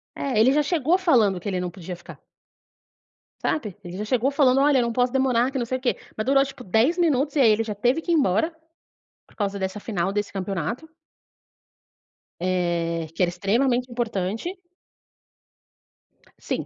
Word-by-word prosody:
É, 255 -6 -1
ele 250 +4 +6
já 295 +1 +3
chegou 325 +2 +2
falando 230 - +3
que 205 - -8
ele 185 -2 -1
não 180 - -3
podia 180 0 -7
ficar - - -13 1.2
sabe. 210 -10 -2
Ele 175 +1 -7
já 210 - -3
chegou 255 +4 +1
falando: 270 -2 +4
"Olha, 280 -2 +4
eu - - +3
não 235 0 -1
posso 245 +1 +1
demorar, 260 -1 +2
que 270 - -3
não 240 - -1
sei 255 +2 -2
o - - -14
quê", 250 - 0 0.2
mas 215 - -3
durou, 275 +1 +4
tipo, 270 -2 -8
10 230 - +2
minutos, 295 -4 +1
e - - +2
aí, 235 -4 +6
ele 220 +1 +2
já 210 -2 -5
teve 245 +9 +1
que 345 - -3
ir - - +4
embora, 275 - +2 0.7
por - - -24
causa 200 -1 -2
dessa 190 +2 -3
final 195 -3 -2
desse 205 0 -3
campeonato 195 - -4 1.5
eh, 170 -2 -1
que 185 - +1
era 175 - +2
extremamente 240 +7 +1
importante. 235 - -3 1.8
Sim, - - -3
235 Hz, 180 wpm, -24 LUFS, 195-270 Hz, 1.8 s, ele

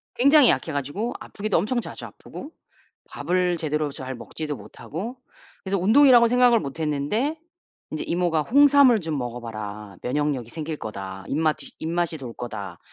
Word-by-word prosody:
굉장히 280 +2 +6
약해 160 - +1
가지고 145 - -3
아프기도 210 -2 -2
엄청 235 +7 0
자주 - - -7
아프고 300 - -10 0.6
밥을 180 -1 0
제대로 150 -2 -1
잘 130 -1 -6
먹지도 150 +4 -5
못하고 220 - -7 0.5
그래서 195 +1 0
운동이라곤 235 +4 +6
생각을 245 -1 +5
못 140 +2 -7
했는데 160 - -1 0.5
인제 155 - -4
이모가 170 -3 +1
"홍삼을 280 - +6
좀 160 -3 -2
먹어봐라. 110 -5 -6
면역력이 135 -3 -1
생길 155 +1 -5
거다. 95 -4 -7
입마튀 155 +2 -1
입맛이 165 0 -1
돌 125 -4 -7
거다." 100 -7 -7
160 Hz, 355 characters per minute, -24 LUFS, -, 0.6 s, 굉장히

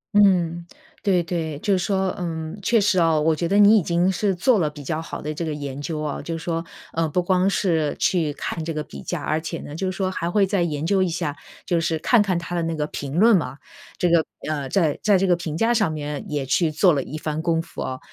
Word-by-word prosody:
嗯， 175 -4 +3 0.3
对 185 -4 +2
对， 165 -3 -3
就 200 +7 0
是 190 - +2
说 190 -2 0
嗯， 165 +1 -4
确 230 +4 +3
实 200 -2 +2
啊， 165 -2 +3
我 160 +1 +2
觉 170 +2 -1
得 200 - +3
你 210 +1 +7
已 - - -1
经 175 +2 +1
是 195 +1 0
做 215 +5 +3
了 155 -4 +1
比 150 -1 -10
较 155 +3 -2
好 165 - -6
的 150 +1 -3
这 160 - -4
个 160 - -2
研 140 -1 -5
究 155 +1 -3
啊， 150 -2 -3
就 165 -1 -4
说， 165 0 -3 0.3
呃， 165 -1 0
不 180 +4 0
光 185 +1 +2
是 165 -7 +1
去 165 -5 +1
看 160 - -4
这 165 0 -4
个 155 - -2
比 - - -10
价， 175 -4 -4
而 155 +1 0
且 165 - -4
呢， 145 - -9
就 190 +4 -2
是 185 - -5
说 190 -1 0
还 170 -2 -2
会 200 +2 +3
再 195 -1 0
研 155 -3 -1
究 190 +2 +2
一 185 - +2
下， 165 -4 -2 0.3
就 170 -2 +1
是 165 0 0
看 220 +8 +4
看 190 -4 +1
它 170 +1 -4
的 170 - 0
那 165 0 -2
个 150 -1 -1
评 140 -1 -6
论 225 +2 +6
嘛。 155 -6 -1 0.4
这 180 - +1
个 170 -2 +4 0.2
呃， 145 -3 -2
在 160 -5 +1
在 205 -2 +4
这 190 - +1
个 180 -2 +4
评 165 -3 -5
价 230 +6 +2
上 215 -8 +2
面 150 -1 -4
也 145 -3 -2
去 160 +5 +2
做 165 +4 +4
了 140 - 0
一 145 +4 -6
番 155 0 -3
功 165 -1 +1
夫 165 -1 -6
啊。 130 0 -4
170 Hz, 280 characters per minute, -23 LUFS, 155-185 Hz, 0.4 s, 你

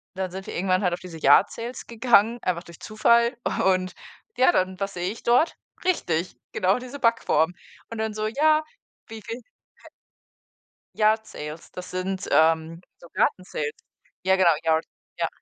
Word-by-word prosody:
dann 190 -1 -3
sind 190 +1 -8
wir - - -6
irgendwann 185 0 +1
halt 180 -3 +1
auf 175 - -3
diese 175 -3 -10
Yard 145 -1 +5
Sales 235 +2 -7
gegangen, 235 0 +3
einfach 175 -1 -1
durch 170 -2 -14
Zufall 235 +3 +2 0.3
und, 185 -1 +1 0.4
ja, 255 - +5
dann, 185 0 0
was 195 0 -3
sehe 180 +2 -2
ich 225 - -10
dort? 245 +7 +2 0.3
Richtig, 180 - 0 0.2
genau, 190 +6 +2
diese 255 +3 -8
Backform 205 - +2 0.4
und 230 - -5
dann 220 -1 -2
so: 215 0 -2
„Ja, 305 +6 +3 0.4
wie 225 -1 -9
viel 230 +4 -7
k” - - -35 1.5
Yard 220 0 +3
Sales, 150 -2 -9
das 180 0 -8
sind, 185 +1 -3
ähm, 160 +1 +3 0.2
so 170 - -15
Garten-Sales. 155 -5 -1 0.5
Ja, 190 0 +4
genau, 185 -2 +4 0.2
Yard, 160 0 +2 0.3
ja. - - +1
190 Hz, 165 wpm, -25 LUFS, 175-230 Hz, 1.5 s, Yard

